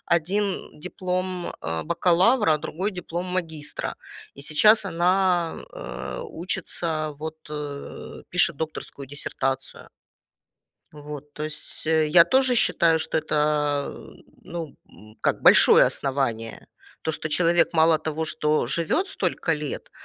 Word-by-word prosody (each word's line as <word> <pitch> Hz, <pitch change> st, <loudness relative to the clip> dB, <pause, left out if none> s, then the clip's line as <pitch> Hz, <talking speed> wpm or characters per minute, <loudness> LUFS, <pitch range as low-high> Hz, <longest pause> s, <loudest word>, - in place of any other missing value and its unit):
Один 195 Hz, +4 st, -1 dB, 0.2 s
диплом, 185 Hz, 0 st, -3 dB
э, 80 Hz, 0 st, -3 dB
бакалавра, 175 Hz, +2 st, +3 dB
другой 175 Hz, +6 st, -3 dB
диплом 180 Hz, -1 st, -5 dB
магистра. 165 Hz, -5 st, -4 dB, 0.4 s
И 140 Hz, -, -9 dB
сейчас 210 Hz, +9 st, +4 dB
она, 180 Hz, -1 st, +1 dB, 0.2 s
э, -, -, -7 dB, 0.2 s
учится, 170 Hz, -, -3 dB
вот, 160 Hz, +1 st, -6 dB
э, 145 Hz, -2 st, -7 dB
пишет -, -, +3 dB
докторскую 155 Hz, -3 st, -6 dB
диссертацию. 135 Hz, -1 st, -4 dB, 1.1 s
Вот, 150 Hz, -1 st, -9 dB
то 150 Hz, -, -5 dB
есть, 155 Hz, 0 st, -5 dB
я 160 Hz, +1 st, +5 dB
тоже 260 Hz, +2 st, +3 dB
считаю, 170 Hz, -7 st, +3 dB
что 160 Hz, -, -1 dB
это, 150 Hz, -2 st, 0 dB, 0.5 s
ну, 165 Hz, -3 st, -7 dB
м, 110 Hz, +1 st, -17 dB
как, -, -, 0 dB
большое -, -, +8 dB
основание. 120 Hz, -5 st, -2 dB, 0.4 s
То, -, -, -1 dB
что 160 Hz, -, -3 dB
человек 170 Hz, +2 st, +3 dB
мало 160 Hz, -1 st, +4 dB
того, 155 Hz, 0 st, -3 dB
что 150 Hz, -3 st, 0 dB
живет 170 Hz, -, 0 dB
столько 380 Hz, -, -1 dB
лет, 150 Hz, -2 st, -4 dB
160 Hz, 115 wpm, -24 LUFS, 150-180 Hz, 1.1 s, большое